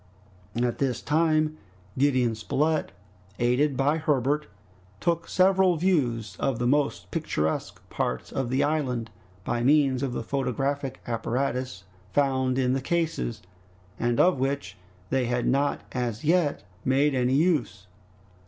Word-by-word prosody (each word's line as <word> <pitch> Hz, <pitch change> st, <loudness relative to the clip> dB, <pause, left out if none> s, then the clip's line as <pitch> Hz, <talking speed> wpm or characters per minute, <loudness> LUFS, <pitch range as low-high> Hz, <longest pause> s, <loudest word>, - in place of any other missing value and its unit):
At 120 Hz, -1 st, 0 dB
this 130 Hz, -4 st, 0 dB
time 155 Hz, 0 st, +1 dB, 0.4 s
Gideon 130 Hz, -4 st, +2 dB
Spilett, 150 Hz, +8 st, 0 dB, 0.5 s
aided 130 Hz, +3 st, +2 dB
by 145 Hz, +4 st, +2 dB
Herbert, 150 Hz, 0 st, +1 dB, 0.5 s
took 170 Hz, +6 st, 0 dB
several 185 Hz, -1 st, +3 dB
views 120 Hz, -, 0 dB
of 135 Hz, -4 st, 0 dB
the 120 Hz, -, -1 dB
most 120 Hz, -10 st, 0 dB
picturesque 80 Hz, +1 st, -2 dB
parts 65 Hz, -, -2 dB
of 135 Hz, -3 st, -2 dB
the 130 Hz, +3 st, +2 dB
island, 130 Hz, -7 st, -1 dB, 0.3 s
by 120 Hz, +4 st, -1 dB
means 135 Hz, -1 st, +3 dB
of 135 Hz, -3 st, -2 dB
the 120 Hz, -, -3 dB
photographic 135 Hz, +2 st, -2 dB
apparatus 125 Hz, -2 st, -2 dB, 0.3 s
found 130 Hz, -2 st, +1 dB
in 130 Hz, -1 st, +2 dB
the 135 Hz, -, 0 dB
cases, 150 Hz, -, -1 dB, 0.6 s
and 120 Hz, 0 st, 0 dB
of 180 Hz, -6 st, +4 dB
which 140 Hz, +2 st, -2 dB, 0.4 s
they 130 Hz, -1 st, +2 dB
had 120 Hz, 0 st, 0 dB
not 140 Hz, +2 st, +1 dB
as 120 Hz, -3 st, -3 dB
yet 160 Hz, -1 st, +2 dB, 0.2 s
made 140 Hz, +3 st, +2 dB
any 130 Hz, 0 st, +2 dB
use. 145 Hz, -, +1 dB
135 Hz, 130 wpm, -26 LUFS, 120-150 Hz, 0.6 s, of